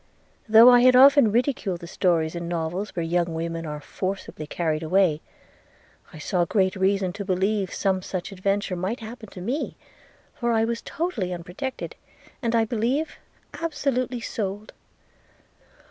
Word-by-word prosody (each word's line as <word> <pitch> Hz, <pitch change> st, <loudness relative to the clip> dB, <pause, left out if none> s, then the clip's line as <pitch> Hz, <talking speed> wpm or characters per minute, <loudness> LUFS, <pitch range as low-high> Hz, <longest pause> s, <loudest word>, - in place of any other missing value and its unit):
Though 225 Hz, +3 st, +9 dB
I 245 Hz, -, +7 dB
had 255 Hz, +1 st, +6 dB
often 275 Hz, -3 st, +7 dB
ridiculed 230 Hz, -6 st, 0 dB
the -, -, -7 dB
stories 170 Hz, -3 st, +1 dB
in 170 Hz, -1 st, -5 dB
novels 175 Hz, +4 st, -3 dB
where 170 Hz, -, -1 dB
young 170 Hz, 0 st, 0 dB
women 165 Hz, 0 st, -3 dB
are 150 Hz, 0 st, -5 dB
forcibly 185 Hz, -2 st, -5 dB
carried 155 Hz, -1 st, -1 dB
away, 165 Hz, -2 st, +2 dB, 0.9 s
I -, -, -11 dB
saw 175 Hz, +3 st, 0 dB
great 190 Hz, +1 st, +1 dB
reason 190 Hz, -1 st, +1 dB
to 200 Hz, -, -5 dB
believe 195 Hz, +1 st, 0 dB
some 190 Hz, -2 st, 0 dB
such 185 Hz, +1 st, -5 dB
adventure 195 Hz, 0 st, -1 dB
might 190 Hz, +8 st, -3 dB
happen 220 Hz, -1 st, -9 dB
to 180 Hz, -, -10 dB
me, 250 Hz, -, -3 dB, 0.6 s
for 235 Hz, -1 st, -1 dB
I 225 Hz, 0 st, +3 dB
was 230 Hz, 0 st, -3 dB
totally 270 Hz, -, -3 dB
unprotected, 180 Hz, +10 st, -5 dB, 0.5 s
and, 235 Hz, -2 st, 0 dB
I 225 Hz, -1 st, +3 dB
believe, 245 Hz, +7 st, -1 dB, 0.3 s
absolutely 270 Hz, -6 st, -2 dB
sold.' 205 Hz, -1 st, -4 dB
195 Hz, 145 wpm, -25 LUFS, 175-235 Hz, 0.9 s, Though